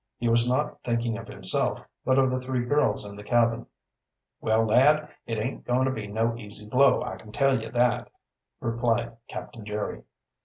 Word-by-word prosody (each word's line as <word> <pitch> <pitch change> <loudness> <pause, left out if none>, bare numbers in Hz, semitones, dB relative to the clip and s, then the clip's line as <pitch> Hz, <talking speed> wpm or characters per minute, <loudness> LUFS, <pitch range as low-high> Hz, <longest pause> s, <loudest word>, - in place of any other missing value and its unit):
He 120 - -2
was 115 +1 +3
not 145 +4 -1
thinking 115 -1 -1
of 115 - -10
himself, - - +2 0.2
but 130 0 +2
of 130 -1 +4
the 130 - 0
three 125 -1 -2
girls 145 -6 +2
in 100 - -8
the 105 - -10
cabin. 115 0 +1 0.7
"Well, 110 0 +2
lad, 150 +7 +4 0.2
it 115 - -2
aint 115 +5 -3
goin' 125 +2 +1
to 130 - +1
be 110 -5 -5
no 115 +3 0
easy 105 -2 -4
blow, 135 +5 +4
I - - -5
kin 105 - -13
tell 135 -1 +2
ye - - -6
that," 120 0 +1 0.5
responded 115 0 -1
Captain 115 - -8
Jerry. 105 - -4
120 Hz, 185 wpm, -26 LUFS, 110-130 Hz, 0.7 s, of